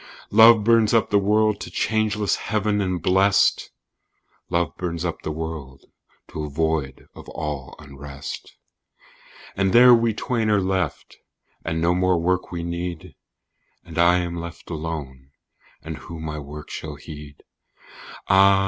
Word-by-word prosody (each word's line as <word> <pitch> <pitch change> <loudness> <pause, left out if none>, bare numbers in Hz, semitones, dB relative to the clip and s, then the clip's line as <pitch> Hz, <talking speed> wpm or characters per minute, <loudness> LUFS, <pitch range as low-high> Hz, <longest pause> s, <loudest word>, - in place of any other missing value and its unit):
Love 110 0 +7
burns 115 0 +4
up 115 - +2
the 100 - +4
world 105 +1 +2
to - - -6
changeless 105 +2 0
heaven 105 -1 -1
and 90 -4 -2
blest, 95 +2 +3 0.8
"Love 85 -3 0
burns 85 -1 -4
up 85 -2 -3
the - - -4
world 75 -4 -7 0.4
to 75 - -6
a 75 - -5
void 75 -3 -2
of - - -12
all 75 -4 -5
unrest." 70 -1 -9 1.0
And 95 -1 +1
there 125 +1 +8
we 115 -2 +3
twain 115 -2 -1
are 105 -1 +3
left, 95 -4 -2 0.5
and 80 0 -2
no 85 +2 +2
more 90 -1 +2
work 90 +2 -1
we 85 -1 -4
need: 85 0 -5 0.7
"And - - -6
I 85 +1 +5
am 85 -1 -2
left 85 +1 -8
alone, 75 -5 -6 0.5
and 80 -1 -6
who 85 -2 -9
my 75 -1 -5
work 75 +1 -9
shall 75 -2 -6
heed?" 75 0 -11 0.8
Ah! 95 0 +6
85 Hz, 145 wpm, -23 LUFS, 75-100 Hz, 1.0 s, there